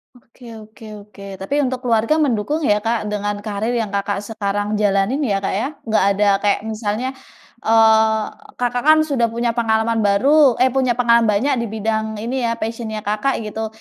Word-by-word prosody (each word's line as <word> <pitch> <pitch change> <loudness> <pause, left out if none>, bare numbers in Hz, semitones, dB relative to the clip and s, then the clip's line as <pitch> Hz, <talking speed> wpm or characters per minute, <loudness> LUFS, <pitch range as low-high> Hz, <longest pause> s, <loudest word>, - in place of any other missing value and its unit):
Oke 245 +1 -22 0.2
oke 220 +1 -15 0.2
oke. 200 -1 -15 0.2
Tapi 195 +9 -3
untuk 255 0 -3
keluarga 230 +3 +2
mendukung 290 0 0
ya, 210 -6 +2
Kak, 225 +2 -1
dengan 205 0 -2
karir 215 +2 -3
yang 225 -4 -2
Kakak 200 0 -2
sekarang 205 -1 -3
jalanin 200 +5 +1
ya, 200 -9 -1
Kak, - - -1
ya? 230 - -1 0.2
Nggak 220 -4 +1
ada 210 +1 +1
kayak 205 0 +1
misalnya, 220 +4 -3 0.5
eee, 220 -1 +4 0.3
Kakak 245 0 -2
kan 310 0 +7
sudah 275 -6 0
punya 235 +1 -1
pengalaman 225 -1 0
baru 255 +7 +4
eh 260 0 +4
punya 255 -2 +1
pengalaman 235 -1 +3
banyak 215 +7 +1
di 235 - -2
bidang 220 0 -2
ini 245 +1 -2
ya 230 - -1
passion-nya 225 -1 -5
Kakak 215 +4 -1
gitu. 220 +1 -4
225 Hz, 175 wpm, -19 LUFS, 210-245 Hz, 0.5 s, kan